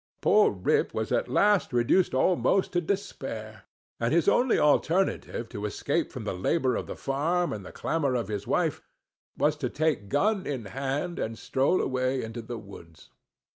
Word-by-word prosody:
Poor 430 -1 +5
Rip 445 0 0
was - - -2
at - - +1
last 205 -5 +3
reduced 125 +7 +2
almost 185 +6 +2
to 175 - +2
despair; 115 - -5 0.3
and 115 +1 0
his 170 0 +2
only 250 0 +4
alternative, 155 -4 +1
to 105 -4 -7
escape 100 - -1
from - - -6
the - - -3
labor 130 - +1
of - - -3
the - - -6
farm 165 +6 0
and 100 -4 -7
clamor 145 -6 0
of 115 -5 -1
his 105 -1 -4
wife, - - 0 0.6
was 150 0 +2
to 130 -4 -2
take 150 -10 -1
gun 195 +7 +1
in 130 -6 -3
hand 140 - -3
and 115 0 -3
stroll 135 +9 +1
away 130 0 0
into 115 +1 -6
the 115 +1 -6
woods. 95 -6 -13
135 Hz, 170 wpm, -27 LUFS, 115-175 Hz, 0.6 s, Poor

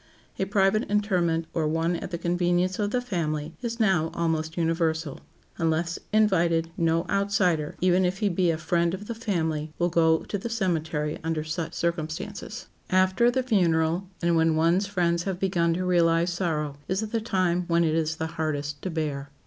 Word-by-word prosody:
A 190 - +1
private 200 +3 +2
interment, 180 -6 +1
or 160 -2 0
one 165 +2 0
at 170 - -5
the 175 - -3
convenience 175 +2 0
of 205 -1 +1
the 245 +3 0
family, 160 -8 -2
is 235 -1 -4
now 190 -7 +2
almost 160 -1 -1
universal. 165 -3 0 0.4
Unless 165 +1 0
invited, 170 -6 +2
no 165 0 +1
outsider, 185 -6 +1
even 185 +1 +3
if 180 +1 0
he 210 - +1
be 180 -2 +1
a 165 - +1
friend 170 +2 0
of 205 +2 -9
the 235 - -4
family, 160 -9 -2
will 175 0 +1
go 160 -1 +3
to 205 - -4
the 235 - -5
cemetery 160 -8 -1
under 160 -1 -1
such 160 +1 -4
circumstances. 170 +7 -3 0.2
After 185 +6 +3
the 260 +1 0
funeral, 175 -5 +1
and 170 0 +3
when 160 -1 +3
one's 170 +5 +2
friends 175 -4 +1
have 190 -2 -2
begun 175 -3 +1
to 185 +1 -2
realize 170 -1 +3
sorrow, 150 -5 -2
is 190 +3 0
the 225 +1 -2
time 180 -4 0
when 170 0 +3
it 160 -2 +1
is 160 0 0
the 160 - -3
hardest 150 -3 -3
to 185 - -3
bear. 150 -4 -3
170 Hz, 180 wpm, -26 LUFS, 160-190 Hz, 0.4 s, even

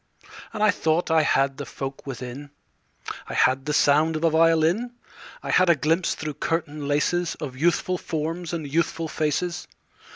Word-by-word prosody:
And 215 -1 -2
I 215 - +6
thought 160 -2 0
I 160 -1 +5
had 135 -2 +1
the 145 - -5
folk 135 +1 -7
within: 130 +2 -7 0.8
I - - -6
had 130 +1 +2
the - - 0
sound 150 +2 +3
of 155 - -3
a 165 - +4
violin; 165 +8 +3 0.5
I - - -3
had 185 -1 +4
a 170 - +6
glimpse 165 +5 +1
through 155 -1 -5
curtain 155 -3 -2
laces 165 +4 0
Of 135 -4 -7
youthful 175 +4 +1
forms 165 +2 -3
and 165 -3 -3
youthful 165 +2 -1
faces. 160 +3 -2
160 Hz, 165 wpm, -24 LUFS, 145-170 Hz, 0.8 s, I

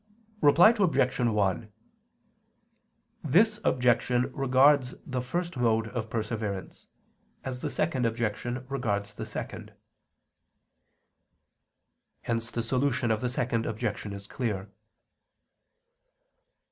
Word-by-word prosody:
Reply 165 +9 +7
Obj. 135 -9 +2
1: 105 -2 0 1.5
This 210 - +3
objection 125 -2 +2
regards 135 -1 +3
the 130 -2 -2
first 170 +5 -3
mode 115 -2 +1
of 115 -2 -4
perseverance, 110 -4 -4 0.6
as 130 -1 -4
the - - -3
second 125 -3 0
objection 120 +2 -3
regards 110 -7 -2
the - - -6
second. - - -7 2.5
Hence 115 -1 -1
the 115 - -3
solution 125 -1 0
of 110 - 0
the 125 - 0
second 120 -2 -1
objection 110 -2 -3
is 100 0 -8
clear. 105 -4 -4
120 Hz, 95 wpm, -28 LUFS, 110-130 Hz, 2.5 s, Reply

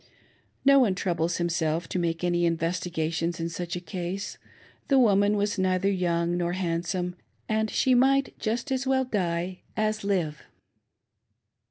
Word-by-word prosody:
No 275 0 +7
one 215 -8 +3
troubles 175 -2 -1
himself 165 -1 0
to 185 - -1
make 165 0 -1
any 175 -1 +1
investigations 165 0 -1
in 165 0 -2
such 175 +1 -4
a - - -3
case: 180 +2 -5 0.2
— - - -28
the 275 - +4
woman 205 -4 +4
was 205 0 0
neither 185 +1 +2
young 175 -2 0
nor 175 0 -1
handsome, 180 0 -2 0.3
and 220 0 0
she 260 - +2
might 270 +2 +3
just 235 +6 -2
as 265 0 -1
well 265 0 +2
die 180 -5 -2 0.2
as 215 0 0
live 175 -7 -1
180 Hz, 150 wpm, -27 LUFS, 170-210 Hz, 0.3 s, No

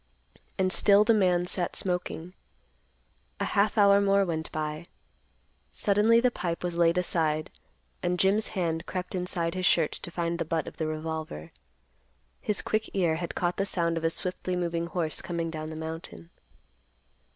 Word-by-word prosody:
And 185 0 +2
still 200 0 +6
the 230 +2 +4
man 180 -4 +3
sat 180 0 0
smoking. 180 -1 -2 1.1
A - - 0
half 210 +2 +1
hour 200 -1 +6
more 200 0 +3
went 160 -3 -3
by. 155 +1 -3 0.9
Suddenly 210 +3 +4
the 250 +1 +3
pipe 175 -5 -3
was 175 -1 -2
laid 170 0 +3
aside, 155 -4 0 0.5
and 180 0 0
Jim's 200 +4 +2
hand 165 -2 -1
crept 185 -1 -4
inside 180 -2 -1
his 185 -1 0
shirt 165 -3 +3
to - - -6
find 170 0 -2
the - - +1
butt 160 0 -1
of - - -9
the 160 - -1
revolver. 155 - -5 0.9
His 210 - -2
quick 215 0 -1
ear 170 -4 +2
had 170 0 -5
caught 175 0 0
the 195 - +1
sound 170 -4 0
of 165 - -3
a 165 - +3
swiftly 180 +2 -3
moving 170 -1 -1
horse 170 -3 -2
coming 170 -2 -3
down 155 -1 -5
the 160 - -6
mountain. 160 - -7
175 Hz, 165 wpm, -28 LUFS, 165-190 Hz, 1.1 s, still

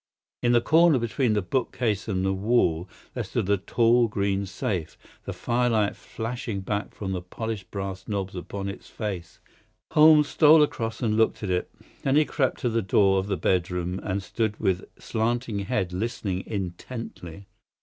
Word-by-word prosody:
In 120 - +3
the 120 - +5
corner 160 +1 +5
between 115 0 0
the 105 -2 +1
bookcase 115 0 -1
and 95 -3 -1
the 95 - +1
wall 95 -4 +1 0.2
there - - -2
stood - - -2
a 100 - +4
tall 115 +4 +3
green 100 -2 -1
safe, 90 -3 -3 0.3
the - - -3
firelight 120 -4 +1
flashing 115 -3 -5
back 100 +2 -3
from 95 -2 -4
the 90 -2 -2
polished 110 +3 -5
brass 95 -1 -5
knobs 95 -3 -3
upon 100 +2 -5
its 100 - -7
face. 95 -6 -5 0.5
Holmes 150 -1 +7
stole 155 +1 +6
across 115 -5 -3
and 110 -2 +1
looked 110 -1 +2
at 100 - -1
it. 90 0 -1 0.3
Then 135 0 +1
he 155 +1 +5
crept 135 -4 0
to 120 - +1
the 115 0 +1
door 95 0 +3
of 95 - -3
the 100 -2 -1
bedroom, 90 0 0
and 100 0 -2
stood 110 0 -2
with 95 -1 0
slanting 115 -1 -1
head 95 -3 -1
listening 95 -2 -3
intently. 100 -2 -6
105 Hz, 170 wpm, -26 LUFS, 95-120 Hz, 0.5 s, Holmes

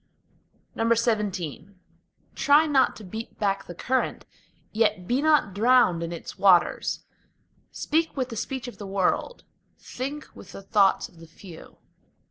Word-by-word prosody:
XVII 210 - 0 0.7
Try 290 +2 +4
not 280 -4 +2
to 220 - -11
beat 220 +4 -8
back 195 -2 -1
the 175 - -8
current, 260 +8 -1 0.5
yet 210 -4 +1
be 250 +3 +1
not 300 -10 +3
drowned 220 -5 +4
in 170 0 -4
its 170 - -8
waters; 185 -3 +3 0.7
Speak 320 0 -1
with 255 -1 -1
the 230 - -6
speech 260 +3 -4
of 245 - -10
the 205 - -7
world, 195 - -1 0.3
think 280 +4 -6
with - - -13
the 195 - -9
thoughts 195 -1 +2
of 170 - -21
the 165 - -13
few. 165 0 -13
215 Hz, 140 wpm, -25 LUFS, 185-255 Hz, 0.7 s, Try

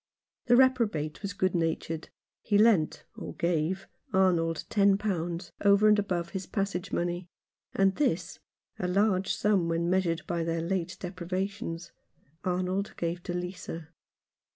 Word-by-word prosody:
The 240 - +6
reprobate 230 - +2
was 200 -2 -3
good 185 -2 +1
natured. 165 -1 -1 0.3
He 205 - +2
lent 205 -8 +4
— - - -41
or - - -7
gave 170 +3 0
— - - -51
Arnold 170 -4 +2
ten 200 -2 +4
pounds 175 -4 -2
over 200 +1 +6
and 210 0 +6
above 175 -4 -1
his 190 -1 -5
passage 195 -3 -2
money, 175 +1 -1 0.5
and 195 0 +4
this 185 - 0 0.2
— - - -66
a 180 - -1
large 195 0 +2
sum 195 -5 +2
when 170 +1 0
measured 180 -3 +1
by 170 -2 -1
their 165 0 -1
late 185 +1 -2
deprivations 185 -1 -4 0.3
— 140 - -36
Arnold 185 +2 -1
gave 170 +1 -2
to 175 - -4
Lisa. 175 -3 -5
180 Hz, 155 wpm, -29 LUFS, 170-195 Hz, 0.5 s, The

